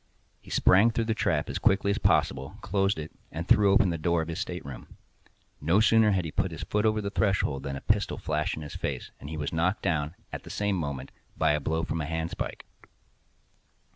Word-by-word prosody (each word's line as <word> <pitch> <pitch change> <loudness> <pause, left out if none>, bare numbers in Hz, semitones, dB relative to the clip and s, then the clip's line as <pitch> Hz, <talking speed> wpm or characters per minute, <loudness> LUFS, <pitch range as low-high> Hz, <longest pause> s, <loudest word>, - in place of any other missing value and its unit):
He - - -15
sprang 100 +5 +5
through 115 0 -1
the 110 - +1
trap - - 0
as - - -3
quickly 100 +1 +3
as - - -1
possible, 65 +2 +1
closed 100 -1 +1
it, 80 0 -6 0.2
and 85 +3 -5
threw 100 -2 +5
open 95 -2 +4
the 85 - -3
door 85 0 +1
of 80 - -8
his 85 +2 -4
stateroom. 70 -8 -6 0.6
No 85 +7 +3
sooner 110 0 +5
had 95 -4 +1
he 80 - -4
put - - 0
his - - -6
foot 105 +1 +1
over 110 0 +1
the 100 -1 -3
threshold 95 -11 +1
than 70 0 -4
a 70 - -6
pistol 105 -1 +1
flashed 75 0 -1
in 80 - -7
his 75 - -8
face, - - -4
and 70 - -8
he 80 - -5
was 75 0 -3
knocked 85 +5 0
down, 80 -3 0 0.2
at - - -4
the - - -12
same 100 -1 0
moment, 70 -6 -4 0.3
by - - +3
a 75 - +1
blow 80 +3 -1
from 80 - -2
a - - -2
handspike. 80 +1 -4
85 Hz, 220 wpm, -28 LUFS, 75-100 Hz, 0.6 s, sprang